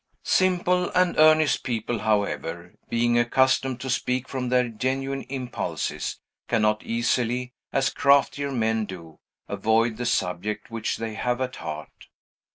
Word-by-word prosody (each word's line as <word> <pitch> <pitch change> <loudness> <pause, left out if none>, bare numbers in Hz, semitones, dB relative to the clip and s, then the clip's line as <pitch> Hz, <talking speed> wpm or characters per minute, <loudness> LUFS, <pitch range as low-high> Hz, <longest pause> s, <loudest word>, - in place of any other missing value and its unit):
Simple 180 -1 +2
and 180 -1 +3
earnest 155 -1 +5
people, 120 -1 -2
however, 95 -5 -1 0.2
being 120 0 +2
accustomed 130 +1 +2
to 130 - -4
speak 125 +1 -1
from 125 -2 -3
their 125 0 +3
genuine 135 +4 -2
impulses, 130 -2 -3 0.3
cannot 105 -2 +2
easily, 120 +1 -1 0.2
as 135 0 +1
craftier 140 0 +3
men 110 -3 0
do, 85 -5 -10 0.3
avoid 110 0 +1
the 120 0 -2
subject 105 0 -2
which 115 -1 -2
they 115 -1 -4
have 125 +3 -1
at 130 0 -3
heart. 75 +1 -8
120 Hz, 130 wpm, -25 LUFS, 110-135 Hz, 0.3 s, earnest